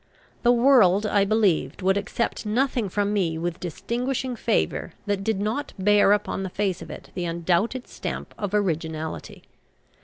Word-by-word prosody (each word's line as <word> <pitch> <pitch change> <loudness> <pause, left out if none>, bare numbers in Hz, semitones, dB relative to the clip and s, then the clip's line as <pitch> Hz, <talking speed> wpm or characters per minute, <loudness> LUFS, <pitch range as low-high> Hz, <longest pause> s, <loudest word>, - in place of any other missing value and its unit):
The 240 - +5
world, 235 -6 +5
I 205 -1 +3
believed, 195 -7 +1
would 190 +1 +3
accept 215 +3 -2
nothing 235 0 0
from 205 +2 0
me 170 -6 0
with 170 +1 -3
distinguishing 245 - -3
favour - - -1
that 205 -2 -1
did 220 -1 0
not 220 +8 -2
bear 205 +1 +4
upon 205 -1 +1
the 190 - -3
face 190 -1 -1
of - - -9
it - - -10
the 180 -1 -3
undoubted 175 +9 0
stamp - - -6
of 205 -1 -3
originality. 160 -5 -3
205 Hz, 155 wpm, -25 LUFS, 180-225 Hz, -, The